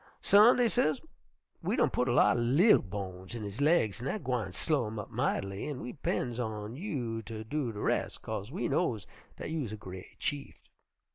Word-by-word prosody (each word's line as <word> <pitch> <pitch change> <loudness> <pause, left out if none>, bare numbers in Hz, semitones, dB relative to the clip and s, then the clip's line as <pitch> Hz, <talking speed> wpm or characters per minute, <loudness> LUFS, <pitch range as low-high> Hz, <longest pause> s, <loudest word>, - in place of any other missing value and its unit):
"'Son', 210 +4 +7
dey 245 -1 +4
ses, 155 - +2 0.6
'we - - 0
done - - +3
putt 125 - 0
a - - +2
lot 120 - +5
er - - 0
li'l 145 - +5
bones 95 0 -6
in 115 - -5
his 105 +5 -5
laigs, 145 - +3
an' 130 - -3
dat 210 +8 -3
gwine 125 -7 -1
slow 140 - 0
him 110 +1 -6
up 105 - -6
might'ly, 100 0 -1
an' 140 -4 -4
we 125 +1 -6
'pends 125 -4 -2
on 110 -1 -4
you 130 - -3
ter 110 0 -7
do 130 +1 -2
de 105 - -8
res', - - 0
'kase 100 +5 -5
we 185 - -2
knows 120 - 0 0.3
dat - - -5
you 160 -1 -1
is 115 -6 -4
a 110 - -5
gre't 95 -2 -10
chieft.' 145 -1 -5
120 Hz, 210 wpm, -31 LUFS, 105-150 Hz, 0.6 s, Son